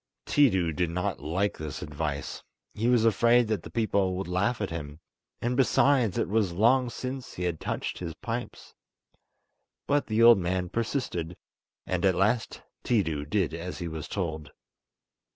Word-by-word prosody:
Tiidu 95 Hz, -, +3 dB
did 90 Hz, 0 st, 0 dB
not 90 Hz, +4 st, -2 dB
like 95 Hz, +6 st, -1 dB
this 80 Hz, 0 st, -5 dB
advice—he 75 Hz, +8 st, -5 dB
was 120 Hz, -2 st, +4 dB
afraid 115 Hz, +2 st, +4 dB
that 110 Hz, -, 0 dB
the -, -, -10 dB
people 100 Hz, -5 st, 0 dB
would 95 Hz, -1 st, -4 dB
laugh 95 Hz, +7 st, 0 dB
at 100 Hz, -5 st, -3 dB
him; 75 Hz, -2 st, -6 dB, 0.4 s
and, 120 Hz, +1 st, 0 dB
besides, 130 Hz, -4 st, +3 dB
it -, -, +1 dB
was 105 Hz, -3 st, +1 dB
long 120 Hz, +6 st, +3 dB
since 130 Hz, +2 st, -6 dB
he 90 Hz, -, -4 dB
had 85 Hz, -3 st, -1 dB
touched -, -, -3 dB
his 85 Hz, -3 st, -5 dB
pipes—but 120 Hz, -, -7 dB
the 110 Hz, +1 st, +2 dB
old 115 Hz, -3 st, +8 dB
man 90 Hz, 0 st, -1 dB
persisted, 110 Hz, -, -3 dB, 0.5 s
and 90 Hz, -1 st, -2 dB
at 95 Hz, -2 st, +4 dB
last 110 Hz, +5 st, 0 dB, 0.2 s
Tiidu 80 Hz, -11 st, 0 dB
did 90 Hz, -4 st, +1 dB
as 85 Hz, +2 st, -5 dB
he 85 Hz, -, -4 dB
was 80 Hz, -2 st, -6 dB
told. 80 Hz, -6 st, -4 dB
95 Hz, 150 wpm, -28 LUFS, 85-115 Hz, 0.5 s, old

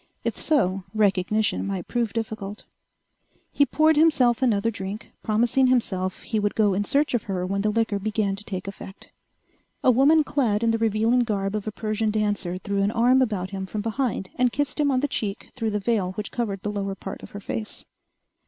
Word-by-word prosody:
If -, -, -1 dB
so, 195 Hz, -, +1 dB
recognition 205 Hz, 0 st, +1 dB
might 190 Hz, -3 st, -4 dB
prove 235 Hz, -3 st, -1 dB
difficult. 215 Hz, -2 st, -4 dB, 0.9 s
He 285 Hz, -, +3 dB
poured 310 Hz, 0 st, +3 dB
himself 270 Hz, -7 st, +4 dB
another 230 Hz, -3 st, +2 dB
drink, 200 Hz, +1 st, -6 dB
promising 235 Hz, +4 st, +2 dB
himself 190 Hz, -7 st, 0 dB
he 220 Hz, -, -1 dB
would 205 Hz, 0 st, -1 dB
go 210 Hz, -3 st, +3 dB
in 200 Hz, +2 st, 0 dB
search 285 Hz, +4 st, +1 dB
of 240 Hz, -, +2 dB
her 185 Hz, -3 st, -2 dB
when 195 Hz, +2 st, -1 dB
the 210 Hz, -, +1 dB
liquor 220 Hz, -1 st, 0 dB
began 205 Hz, -1 st, -1 dB
to 210 Hz, -, -7 dB
take 190 Hz, -2 st, -5 dB
effect. 195 Hz, 0 st, -10 dB, 0.7 s
A 255 Hz, -, +6 dB
woman 290 Hz, +6 st, +5 dB
clad 235 Hz, -7 st, 0 dB
in 230 Hz, -, +3 dB
the 225 Hz, -, 0 dB
revealing 225 Hz, +2 st, +2 dB
garb 200 Hz, -4 st, 0 dB
of 215 Hz, 0 st, -3 dB
a -, -, -1 dB
Persian 215 Hz, +1 st, -1 dB
dancer 205 Hz, -4 st, -1 dB
threw 200 Hz, +1 st, -2 dB
an 200 Hz, -, +2 dB
arm 245 Hz, +4 st, +4 dB
about 200 Hz, -7 st, -1 dB
him 190 Hz, -1 st, -4 dB
from 210 Hz, +2 st, -3 dB
behind 225 Hz, -3 st, -2 dB
and 250 Hz, -1 st, +3 dB
kissed 290 Hz, +3 st, -2 dB
him 290 Hz, -1 st, +3 dB
on 255 Hz, -2 st, +2 dB
the 290 Hz, -, +1 dB
cheek 205 Hz, -6 st, -3 dB
through 225 Hz, -4 st, -1 dB
the 210 Hz, -1 st, -1 dB
veil 195 Hz, -3 st, 0 dB
which 205 Hz, +1 st, -5 dB
covered 205 Hz, -6 st, -3 dB
the 210 Hz, -, -2 dB
lower 200 Hz, -1 st, -3 dB
part -, -, -7 dB
of -, -, -10 dB
her 205 Hz, -, -8 dB
face. 215 Hz, +2 st, -5 dB
215 Hz, 200 wpm, -25 LUFS, 200-240 Hz, 0.9 s, A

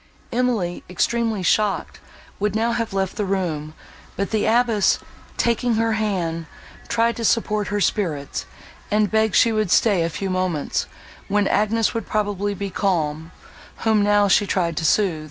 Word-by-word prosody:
Emily, 230 Hz, -8 st, -1 dB
extremely 225 Hz, +2 st, 0 dB
shocked, 210 Hz, +3 st, 0 dB, 0.4 s
would 210 Hz, 0 st, 0 dB
now 230 Hz, +2 st, +1 dB
have 230 Hz, -2 st, -2 dB
left 195 Hz, -1 st, -2 dB
the 210 Hz, -, 0 dB
room; 165 Hz, -6 st, -2 dB, 0.4 s
but 200 Hz, -, -2 dB
the 220 Hz, -2 st, +1 dB
abbess, 230 Hz, -3 st, +3 dB, 0.4 s
taking 235 Hz, 0 st, +1 dB
her 225 Hz, +1 st, +1 dB
hand, 180 Hz, -7 st, -1 dB, 0.4 s
tried 230 Hz, 0 st, +1 dB
to 230 Hz, -, -4 dB
support 215 Hz, -2 st, +1 dB
her 205 Hz, 0 st, -1 dB
spirits, 165 Hz, -8 st, -1 dB, 0.4 s
and 210 Hz, -1 st, +2 dB
begged 220 Hz, 0 st, +2 dB
she 230 Hz, -, +5 dB
would 215 Hz, -3 st, 0 dB
stay 200 Hz, -1 st, +3 dB
a 165 Hz, -, 0 dB
few 190 Hz, +3 st, -4 dB
moments, 185 Hz, -5 st, -1 dB, 0.4 s
when 205 Hz, 0 st, +1 dB
Agnes 215 Hz, +1 st, +1 dB
would 230 Hz, -, -4 dB
probably 205 Hz, -1 st, -1 dB
be 200 Hz, 0 st, -4 dB
calm, 160 Hz, -5 st, -1 dB, 0.5 s
whom 220 Hz, -2 st, +4 dB
now 205 Hz, 0 st, +4 dB
she 200 Hz, +1 st, +3 dB
tried 170 Hz, -4 st, 0 dB
to 160 Hz, -, -1 dB
sooth. 180 Hz, -2 st, +2 dB
205 Hz, 155 wpm, -22 LUFS, 185-220 Hz, 0.5 s, she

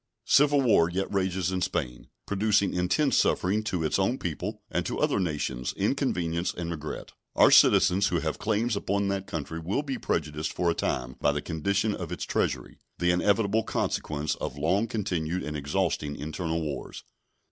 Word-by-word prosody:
Civil 145 Hz, +2 st, +5 dB
war 105 Hz, -10 st, +4 dB
yet 95 Hz, +3 st, -3 dB
rages 95 Hz, -2 st, 0 dB
in 95 Hz, -1 st, -1 dB
Spain, 60 Hz, -6 st, -3 dB, 0.2 s
producing 100 Hz, 0 st, +2 dB
intense 90 Hz, -, +1 dB
suffering 100 Hz, +4 st, +2 dB
to 90 Hz, -5 st, -1 dB
its 80 Hz, -, +1 dB
own 105 Hz, +7 st, +1 dB
people, 90 Hz, -, -4 dB
and 90 Hz, -, 0 dB
to -, -, -3 dB
other -, -, +1 dB
nations 75 Hz, -8 st, -2 dB
inconvenience 85 Hz, 0 st, 0 dB
and 85 Hz, -1 st, -4 dB
regret. 75 Hz, -2 st, -6 dB, 0.2 s
Our -, -, +6 dB
citizens 95 Hz, +3 st, +6 dB
who 85 Hz, -, 0 dB
have 80 Hz, -1 st, -3 dB
claims 110 Hz, +2 st, 0 dB
upon 100 Hz, 0 st, 0 dB
that 95 Hz, -1 st, -2 dB
country 80 Hz, +1 st, -4 dB
will 95 Hz, -, -1 dB
be 135 Hz, -3 st, -4 dB
prejudiced 75 Hz, -1 st, -2 dB
for 85 Hz, -1 st, +1 dB
a -, -, +1 dB
time 65 Hz, -5 st, -2 dB
by 75 Hz, -, +3 dB
the 75 Hz, -, -2 dB
condition 100 Hz, +6 st, 0 dB
of -, -, -6 dB
its -, -, -4 dB
treasury, -, -, -2 dB, 0.2 s
the 90 Hz, 0 st, +2 dB
inevitable 100 Hz, +4 st, +2 dB
consequence 75 Hz, -7 st, -2 dB
of -, -, -5 dB
long 95 Hz, +9 st, +1 dB
continued 90 Hz, -6 st, -2 dB
and 75 Hz, 0 st, -4 dB
exhausting 70 Hz, 0 st, -1 dB
internal 80 Hz, +2 st, -3 dB
wars. 75 Hz, -3 st, -6 dB
90 Hz, 170 wpm, -27 LUFS, 80-100 Hz, 0.2 s, Our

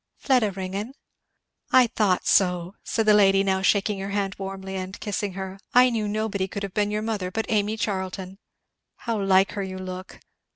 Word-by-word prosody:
"Fleda 250 Hz, -6 st, +2 dB
Ringgan." 195 Hz, +6 st, -5 dB, 0.8 s
"I 255 Hz, -1 st, +7 dB
thought 210 Hz, -6 st, +1 dB
so!" 180 Hz, -1 st, +2 dB
said 225 Hz, -, -1 dB
the 215 Hz, -, +6 dB
lady, 195 Hz, -1 st, +5 dB
now 190 Hz, -1 st, +1 dB
shaking 200 Hz, +1 st, +2 dB
her 195 Hz, +1 st, -4 dB
hand 200 Hz, -1 st, -1 dB
warmly 190 Hz, 0 st, -6 dB
and 190 Hz, +1 st, -5 dB
kissing 205 Hz, -1 st, -3 dB
her, 190 Hz, 0 st, -6 dB, 0.2 s
"I 250 Hz, 0 st, +7 dB
knew 220 Hz, -3 st, -1 dB
nobody 205 Hz, -2 st, -1 dB
could 200 Hz, +1 st, -6 dB
have 195 Hz, -2 st, -5 dB
been 205 Hz, -1 st, +1 dB
your 210 Hz, +1 st, -2 dB
mother 210 Hz, -5 st, -2 dB
but 220 Hz, +4 st, -2 dB
Amy 215 Hz, 0 st, +1 dB
Charlton! 190 Hz, -2 st, -4 dB, 0.6 s
How 230 Hz, -3 st, -3 dB
like 195 Hz, 0 st, +4 dB
her 200 Hz, -, -4 dB
you 190 Hz, -1 st, -5 dB
look! 185 Hz, 0 st, -7 dB
195 Hz, 180 wpm, -25 LUFS, 190-215 Hz, 0.8 s, I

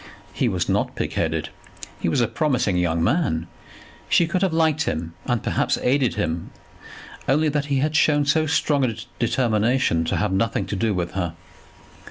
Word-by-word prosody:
He -, -, +1 dB
was -, -, -1 dB
not -, -, 0 dB
pigheaded; -, -, -2 dB, 0.5 s
he -, -, 0 dB
was 120 Hz, -, +1 dB
a 120 Hz, -, +2 dB
promising 130 Hz, -, 0 dB
young 85 Hz, -2 st, +1 dB
man; 110 Hz, -, +1 dB, 0.6 s
she 170 Hz, -, +4 dB
could 180 Hz, +3 st, -1 dB
have 190 Hz, -2 st, +2 dB
liked 160 Hz, -2 st, +2 dB
him 80 Hz, +1 st, -3 dB
and 120 Hz, -3 st, 0 dB
perhaps -, -, 0 dB
aided 130 Hz, -1 st, +2 dB
him, 85 Hz, -5 st, -2 dB, 0.8 s
only 150 Hz, +3 st, +3 dB
that 145 Hz, -1 st, -1 dB
he 140 Hz, -1 st, 0 dB
had 150 Hz, +3 st, 0 dB
shown 145 Hz, -1 st, +3 dB
so 155 Hz, +2 st, +2 dB
strong 145 Hz, -1 st, +1 dB
a 115 Hz, -4 st, 0 dB, 0.2 s
determination 115 Hz, -5 st, +1 dB
to -, -, -1 dB
have 105 Hz, -2 st, 0 dB
nothing 110 Hz, +4 st, 0 dB
to -, -, -4 dB
do 105 Hz, +1 st, 0 dB
with 85 Hz, -1 st, -2 dB
her. 90 Hz, -3 st, -2 dB
125 Hz, 175 wpm, -23 LUFS, 95-150 Hz, 0.8 s, she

